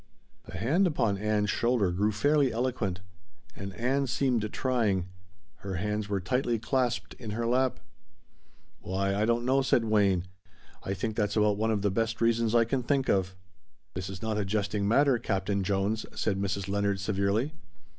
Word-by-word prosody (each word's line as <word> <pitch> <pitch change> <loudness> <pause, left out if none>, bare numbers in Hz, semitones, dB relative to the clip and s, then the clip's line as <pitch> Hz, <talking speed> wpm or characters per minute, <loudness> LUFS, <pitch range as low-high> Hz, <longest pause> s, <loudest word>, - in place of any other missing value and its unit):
'" - - -39
The - - -6
hand 155 - +2
upon 115 - 0
Ann's 105 -1 +1
shoulder 115 -6 +1
grew 100 +4 +1
fairly 140 +5 +2
eloquent. 115 -6 -2 0.5
And 100 0 -6
Ann 135 +4 0
seemed 125 -4 0
trying. 105 -8 0 0.5
Her 95 0 -5
hands 105 +2 -2
were 100 -1 0
tightly 120 +5 0
clasped 125 +1 -1
in 115 -4 -7
her 120 - -1
lap. 125 +1 +1 1.0
"Why, 95 +1 -1
I 105 +2 +1
don't 120 +1 +1
know," 135 +2 +3
said 130 -3 +2
Wayne, 100 -5 +2 0.6
"I 95 - -3
think 110 +3 -3
that's 105 -1 0
about 105 -1 +3
one 110 +1 0
of 105 -2 0
the 100 - +2
best 115 +2 -1
reasons 115 0 +2
I 115 -1 +5
can 130 +3 -1
think 135 +2 0
of." 95 -1 +1 0.6
"This 90 +1 -4
is 95 0 -7
not 110 -1 -1
a - - +1
jesting 100 0 -1
matter, 135 +2 +4
Captain 100 -2 -1
Jones," 100 +3 -1
said 100 -3 -1
Mrs. 100 0 -2
Leonard 100 0 0
severely. 100 +6 0
105 Hz, 175 wpm, -29 LUFS, 100-120 Hz, 1.0 s, I